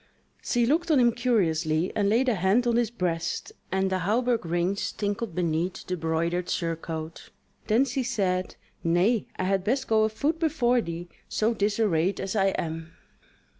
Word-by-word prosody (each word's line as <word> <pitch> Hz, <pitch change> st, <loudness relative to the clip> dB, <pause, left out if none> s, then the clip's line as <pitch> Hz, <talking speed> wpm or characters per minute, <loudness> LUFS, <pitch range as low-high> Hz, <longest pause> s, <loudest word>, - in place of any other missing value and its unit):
She 240 Hz, -1 st, +1 dB
looked 330 Hz, +7 st, +1 dB
on 300 Hz, -4 st, +5 dB
him 240 Hz, -1 st, +5 dB
curiously, 175 Hz, -9 st, +1 dB
and 200 Hz, -1 st, +2 dB
laid 240 Hz, +5 st, +2 dB
a 245 Hz, -, +4 dB
hand 195 Hz, +5 st, +2 dB
on 235 Hz, -1 st, +2 dB
his 235 Hz, -2 st, +2 dB
breast, 170 Hz, -7 st, -2 dB, 0.2 s
and 190 Hz, 0 st, +1 dB
the 185 Hz, -, +1 dB
hauberk 230 Hz, +5 st, +1 dB
rings 175 Hz, +4 st, -1 dB
tinkled 205 Hz, -2 st, -3 dB
beneath 175 Hz, +1 st, -1 dB
the 180 Hz, -, -2 dB
broidered 170 Hz, +2 st, -1 dB
surcoat; 165 Hz, -1 st, -4 dB, 0.4 s
then 230 Hz, +5 st, +4 dB
she 265 Hz, 0 st, -2 dB
said: 195 Hz, -7 st, -1 dB, 0.3 s
"Nay, 180 Hz, +7 st, +2 dB
I -, -, -1 dB
had 190 Hz, 0 st, +1 dB
best 260 Hz, +6 st, 0 dB
go 220 Hz, -1 st, +3 dB
afoot 285 Hz, +9 st, 0 dB
before 250 Hz, -7 st, +2 dB
thee, 170 Hz, -2 st, -6 dB, 0.2 s
so 220 Hz, +2 st, +1 dB
disarrayed 200 Hz, -4 st, +1 dB
as 195 Hz, -, -3 dB
I 195 Hz, -2 st, +3 dB
am." 165 Hz, -3 st, -3 dB
195 Hz, 165 wpm, -27 LUFS, 170-235 Hz, 0.4 s, on